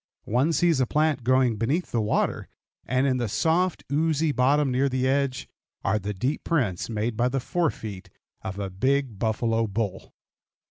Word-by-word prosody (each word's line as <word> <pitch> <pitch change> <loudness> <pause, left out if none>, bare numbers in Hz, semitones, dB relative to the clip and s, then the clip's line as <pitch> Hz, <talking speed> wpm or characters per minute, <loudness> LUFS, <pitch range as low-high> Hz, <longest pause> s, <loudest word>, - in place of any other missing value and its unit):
One 130 +9 +2
sees 165 -3 +2
a 130 - +2
plant 150 -2 +1
growing 130 -2 +3
beneath 140 - -1
the 115 - +1
water, 105 - 0 0.4
and 130 +2 +1
in 130 -2 +2
the 120 -2 -1
soft, 170 - +1
oozy 155 +1 +1
bottom, 140 +1 +2
near 135 +2 +2
the 130 0 0
edge, 135 -1 0 0.4
are 105 - +1
the 105 +1 -4
deep 130 +10 -2
prints 120 - 0
made 110 +1 -2
by 120 +3 +1
the 135 +1 -1
fore 170 +5 0
feet 100 -7 -8 0.3
of 95 +1 -6
a 100 -2 -4
big 130 +2 0
buffalo 115 +1 0
bull. 100 -2 -3
130 Hz, 175 wpm, -25 LUFS, 110-145 Hz, 0.4 s, growing